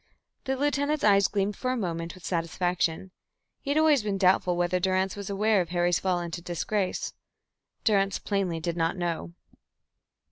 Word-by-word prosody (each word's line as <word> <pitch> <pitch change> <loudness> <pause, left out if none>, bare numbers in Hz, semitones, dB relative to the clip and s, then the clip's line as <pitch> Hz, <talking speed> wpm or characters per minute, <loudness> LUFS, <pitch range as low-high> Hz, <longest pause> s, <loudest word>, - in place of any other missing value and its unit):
The 265 - 0
lieutenant's 290 +1 0
eyes 200 -2 +5
gleamed 200 0 -1
for 255 - -2
a 255 - -1
moment 170 -5 -3
with 185 - -13
satisfaction. 175 +1 -1 0.5
He 280 - -8
had 285 - +2
always 310 -4 +5
been 205 -2 -2
doubtful 185 -2 +3
whether 175 +1 +1
Durrance 185 +1 +1
was 200 -1 -6
aware 205 0 +2
of 170 - -4
Harry's 175 0 +1
fall 185 -2 0
into 170 0 -5
disgrace. 180 +3 -2 0.7
Durrance 195 -3 +2
plainly 190 -5 -1
did 170 +1 -3
not 165 +2 0
know. 170 -1 -3
185 Hz, 165 wpm, -27 LUFS, 175-210 Hz, 0.7 s, eyes